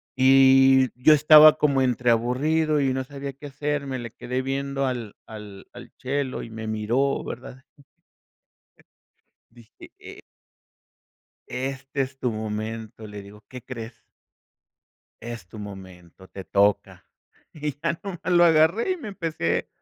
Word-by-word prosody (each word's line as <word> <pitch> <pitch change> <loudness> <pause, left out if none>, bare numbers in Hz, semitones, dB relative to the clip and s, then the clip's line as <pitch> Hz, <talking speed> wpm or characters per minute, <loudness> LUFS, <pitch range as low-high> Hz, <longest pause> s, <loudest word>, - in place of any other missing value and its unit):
y 130 0 +5
yo 155 +4 +7
estaba 150 +1 +8
como 140 -3 +2
entreaburrido 130 +6 +1
y 135 -1 +1
no 130 - -2
sabía 140 0 -7
qué 145 +2 -11
hacer, 145 +1 -3
me 130 -1 -3
le 120 0 -7
quedé 125 +1 -4
viendo 135 +1 -2
al 120 -5 -4
al 105 -3 -11
al 120 0 -12
chelo 135 0 -3
y - - -9
me 110 0 -7
miró, 115 +6 -1
¿verdad? 130 +1 -9 1.9
Dije: 115 -1 -17
"E" - - -12 1.3
este 135 +2 -5
es 135 0 -7
tu 125 - -1
momento, 110 0 -6
le 105 -1 -9
digo, 105 +2 -15
¿qué 125 -2 -10
crees? 115 -2 -8 1.3
Es 115 -5 -8
tu 100 - -14
momento, 95 -3 -12
te 95 +1 -10
toca, 100 +1 0 0.5
y 150 -2 -5
ya 165 +1 -1
nomás 195 -4 -7
lo 175 0 +5
agarré 165 - +3
y - - -3
me 310 - -10
empecé 165 - -2
130 Hz, 135 wpm, -24 LUFS, 110-140 Hz, 1.9 s, estaba